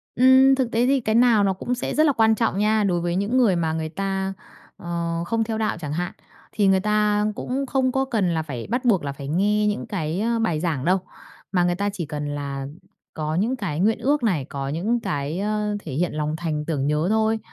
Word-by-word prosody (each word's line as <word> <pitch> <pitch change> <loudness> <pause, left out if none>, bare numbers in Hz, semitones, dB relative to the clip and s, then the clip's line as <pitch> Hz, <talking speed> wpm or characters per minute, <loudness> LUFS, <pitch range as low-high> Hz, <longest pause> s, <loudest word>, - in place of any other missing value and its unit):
Ừm, 260 +2 +6
thực 260 -3 -1
tế 235 +2 +2
thì 270 +1 +3
cái 220 -1 0
nào 235 -3 +5
nó 195 -1 +2
cũng 240 +7 -3
sẽ 250 - -4
rất 310 - +4
là 295 - +4
quan 220 -2 +4
trọng 225 -4 0
nha. 215 +1 +2
Đối 180 -3 +1
với 175 0 -1
những 200 +7 0
người 230 -8 +4
mà 165 -2 0
người 160 0 -3
ta, 195 +2 -2 0.4
ờ, 170 -1 -3
không 230 +4 0
theo 220 0 -3
đạo 220 -4 -1
chẳng 150 -3 -4
hạn, 175 +2 -2 0.4
thì 205 -2 +2
người 190 0 +4
ta 210 +1 +1
cũng 270 +4 -3
không 260 -1 +1
có 265 +1 0
cần 205 -9 0
là 160 - 0
phải 140 -7 -6
bắt 245 +3 -1
buộc 200 -9 +3
là 140 - -3
phải 140 0 -8
nghe 205 +7 +2
những 210 +1 -2
cái, 170 -4 -3
ơ, 230 +1 0
bài 195 -9 0
giảng 155 -5 -2
đâu. 185 +2 +3 0.5
Mà 180 -2 +2
người 175 0 +1
ta 200 +2 -1
chỉ 180 -5 -4
cần 150 -1 -4
là 140 -1 -4 0.5
có 155 0 -3
những 220 +9 +1
cái 190 - -4
nguyện 215 +4 +2
ước 285 0 +1
này, 175 - +1
có 135 0 -5
những 200 +11 0
cái, 145 -3 -3
ơ, 210 0 -1
thể 155 - -7
hiện 170 +5 -1
lòng 150 0 -2
thành 155 -2 -3
tưởng 145 -4 -1
nhớ 150 +3 +1
thôi. 220 +1 +2
195 Hz, 240 wpm, -23 LUFS, 160-225 Hz, 0.5 s, Ừm